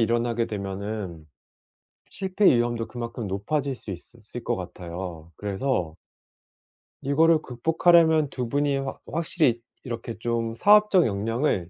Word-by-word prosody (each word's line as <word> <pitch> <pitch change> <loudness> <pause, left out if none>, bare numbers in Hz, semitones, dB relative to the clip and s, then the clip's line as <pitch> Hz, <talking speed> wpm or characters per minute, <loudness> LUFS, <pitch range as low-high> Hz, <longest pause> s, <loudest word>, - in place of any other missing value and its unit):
일어나게 115 0 +1
되면은 100 -4 -5 0.8
실패 190 +1 -2
위험도 120 -1 +3
그만큼 120 -2 -5
높아질 130 +9 -1
수 105 - -9
있으 95 +6 -9 0.2
을 120 - -5
것 - - 0
같아요. 85 -2 -7
그래서 100 -5 -2 1.1
이거를 155 +3 +4
극복하려면 160 +3 +3
2 125 -3 -3
분이 145 +2 +1
확 135 0 -4
확실히 155 -6 +1 0.2
이렇게 120 -2 -5
좀 115 -1 -1
사업적 210 - +5
역량을 105 - 0
120 Hz, 270 characters per minute, -25 LUFS, 100-145 Hz, 1.1 s, 사업적